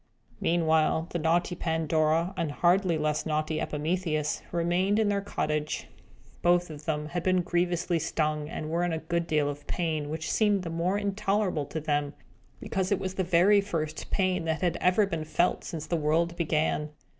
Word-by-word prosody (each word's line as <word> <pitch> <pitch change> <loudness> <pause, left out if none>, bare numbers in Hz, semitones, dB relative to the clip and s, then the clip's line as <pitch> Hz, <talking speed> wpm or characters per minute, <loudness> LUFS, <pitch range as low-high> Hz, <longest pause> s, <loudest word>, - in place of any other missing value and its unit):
Meanwhile, 160 0 +2
the 175 - -2
naughty 170 +3 +1
Pandora, 160 +1 +1
and 160 -3 -1
hardly 175 +2 +2
less 150 -1 0
naughty 155 0 -1
Epimetheus, 155 0 -1
remained 175 +4 +1
in 220 -2 +2
their 200 -1 +1
cottage. 150 -6 -2 0.6
Both 175 -1 +3
of 150 -1 -10
them 150 -1 -2
had 175 +1 -2
been 185 0 +2
grievously 175 -1 0
stung, 155 -1 -1
and 155 -1 -5
were 170 +1 +1
in 175 -1 0
a - - 0
good 170 +1 -2
deal 150 -3 +2
of 145 0 -6
pain, 155 -4 -1
which 160 +1 -3
seemed 205 -3 +2
the 165 - -4
more 175 +4 0
intolerable 200 -6 0
to 160 - -4
them, 145 -1 -1 0.4
because 190 0 -2
it 200 - +3
was 190 0 -4
the 190 - -1
very 185 +4 +5
first 165 -6 -4
pain 185 -3 0
that 160 0 -1
had 175 -2 +1
ever 185 +3 +4
been 165 -5 -3
felt 170 +3 +1
since 155 -2 -5
the 170 - -1
world 165 +3 +1
began. 155 -2 0
170 Hz, 180 wpm, -28 LUFS, 155-180 Hz, 0.6 s, very